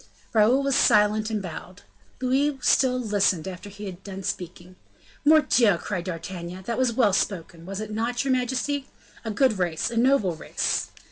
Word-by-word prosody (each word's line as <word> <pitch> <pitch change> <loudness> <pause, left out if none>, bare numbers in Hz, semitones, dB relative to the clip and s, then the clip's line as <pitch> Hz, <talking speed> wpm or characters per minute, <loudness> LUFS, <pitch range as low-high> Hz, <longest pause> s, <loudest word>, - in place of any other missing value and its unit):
Raoul 235 +5 +4
was 275 -1 +1
silent 215 -1 +3
and 215 -2 -2
bowed. 180 +2 -9 0.4
Louis 270 +3 +1
still 255 -1 +3
listened 200 -6 +1
after 190 +2 -7
he 205 +1 -9
had 190 -1 -8
done 195 -1 -7
speaking. 180 0 -6 0.5
"Mordioux!" 265 - +4
cried 175 -1 -4
D'Artagnan, 180 +1 -6
"that 235 +2 -2
was 255 -2 +2
well 220 -5 +3
spoken! 170 -3 -2
was 195 +1 -5
it 215 0 -6
not, 230 +3 -1
your 265 - +2
majesty? 260 +2 -1 0.4
A 225 - -4
good 220 -1 +2
race! 175 +4 -1
a 230 - -4
noble 240 -7 +3
race!" - - -2
210 Hz, 165 wpm, -25 LUFS, 185-250 Hz, 0.5 s, Raoul